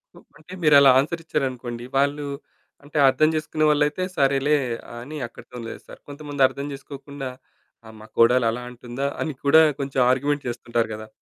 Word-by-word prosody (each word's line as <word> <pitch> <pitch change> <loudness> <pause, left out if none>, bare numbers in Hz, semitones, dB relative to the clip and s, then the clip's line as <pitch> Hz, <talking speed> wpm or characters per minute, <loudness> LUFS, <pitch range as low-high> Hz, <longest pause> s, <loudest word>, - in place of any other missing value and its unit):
హ్మ్. - - -16 0.2
అంటే 180 +4 -13
మీరు 150 -1 +6
అలా 140 -1 +7
ఆన్సర్ 165 +4 -2
ఇచ్చారనుకోండి, 125 -5 -3
వాళ్ళు 145 +1 +1 0.6
అంటే 145 +1 -7
అర్థం 155 +4 +3
చేసుకునే 155 0 -1
వాళ్ళైతే, 150 +4 +1
సరేలే 140 +2 +3 0.5
అని 150 +5 -8
అక్కడితోని 120 0 -11
లేస్తారు. - - -11
కొంతమంది 145 -1 -6
అర్థం 140 +2 -7
చేసుకోకుండా 140 -1 -8 0.6
"ఆ - - -11
మా 110 - -12
కోడలు 120 +1 +5
అలా 125 - -5
అంటుందా?" 125 +3 -5
అని 155 -3 -2
కూడా 150 +3 +7 0.2
కొంచెం 135 -1 -2
ఆర్గ్యూమెంట్ 145 +2 0
చేస్తుంటారు 120 -1 -2
కదా! 110 0 -9
140 Hz, 155 wpm, -23 LUFS, 125-150 Hz, 0.6 s, అలా